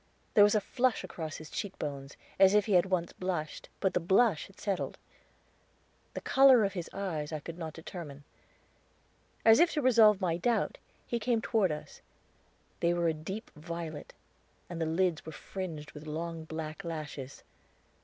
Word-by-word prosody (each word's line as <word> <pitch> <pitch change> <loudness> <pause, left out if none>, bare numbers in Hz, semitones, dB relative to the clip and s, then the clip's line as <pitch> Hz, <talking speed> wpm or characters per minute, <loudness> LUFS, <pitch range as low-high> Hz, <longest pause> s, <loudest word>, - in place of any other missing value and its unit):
There 205 - +8
was 205 +1 +5
a 210 - +3
flush 255 +3 0
across 160 -3 -6
his 155 - -8
cheek 205 -2 -4
bones, 140 -2 -6 0.2
as 195 +1 +7
if 210 - +4
he 215 - -3
had 180 +1 +5
once 180 -2 -1
blushed, 175 -5 -4
and 190 - +2
the - - +2
blush 190 +1 +3
had 195 - -19
settled. 195 -3 -2 1.2
The - - -4
color 265 -4 +6
of 200 - 0
his 175 -4 -5
eyes 165 -7 -3
I 155 - -3
could 165 +3 -8
not 160 -2 -5
determine. 160 -4 -8 1.2
As 225 +1 +8
if 340 0 +5
to 300 - 0
resolve 220 -5 +6
my 175 -4 0
doubt, 235 +4 0 0.3
he 235 - -2
came 230 +1 +1
toward 215 -5 +1
us; 150 - -7 0.8
they 170 0 +2
were 170 -1 +2
a - - +1
deep 190 +8 -7
violet, 160 -1 -7 0.6
and 170 -1 -4
the 160 - +1
lids 170 0 +1
were 160 - -8
fringed 160 -4 -6
with 150 +1 -10
long 165 +1 -4
black 160 +3 -6
lashes. 150 -5 -6
175 Hz, 175 wpm, -31 LUFS, 155-205 Hz, 1.2 s, There